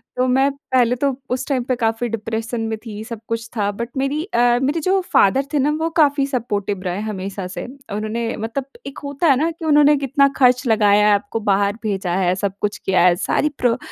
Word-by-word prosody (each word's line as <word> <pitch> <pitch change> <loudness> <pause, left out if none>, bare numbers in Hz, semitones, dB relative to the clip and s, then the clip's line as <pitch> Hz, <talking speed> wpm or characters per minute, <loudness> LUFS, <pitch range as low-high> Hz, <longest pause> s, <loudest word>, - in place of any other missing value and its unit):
तो 255 0 +1
मैं 265 +2 +3
पहले 255 -3 +1
तो 280 - +3 0.2
उस 255 - -2
टाइम 260 -3 0
पे 255 - +2
काफ़ी 230 0 -1
डिप्रेशन 225 +1 -3
में 220 0 -2
थी, 215 -1 -7
सब 230 -1 -7
कुछ 230 0 -3
था 205 -1 +1
बट 235 +4 -5
मेरी 275 +3 -1
अ, 405 - -4 0.3
मेरे 290 +5 0
जो 380 +4 +2
फादर 265 +8 +4
थे 290 - +2
ना 290 +3 +2
वो 325 +1 0
काफ़ी 285 -1 +3
सपोर्टिव 205 -7 -2
रहे 180 +2 -2
हमेशा 195 -1 -5
से। 180 - -6 0.3
उन्होंने 225 +2 -3
मतलब 230 +5 -4 0.2
एक 275 - -8
होता 285 +4 -1
है 275 - +6
ना 320 +4 +1
कि 325 0 -9
उन्होंने 295 -1 +5
कितना 275 0 +2
खर्च 250 -1 +4
लगाया, 210 -1 +4
आपको 205 +3 -3
बाहर 200 +2 +1
भेजा 190 -4 -1
है, 185 -1 +1
सब 195 0 -2
कुछ 210 0 -1
किया 190 -2 +1
है, 175 - +4
सारी 295 +9 0
प्रो 245 0 +2
230 Hz, 210 wpm, -20 LUFS, 205-275 Hz, 0.3 s, है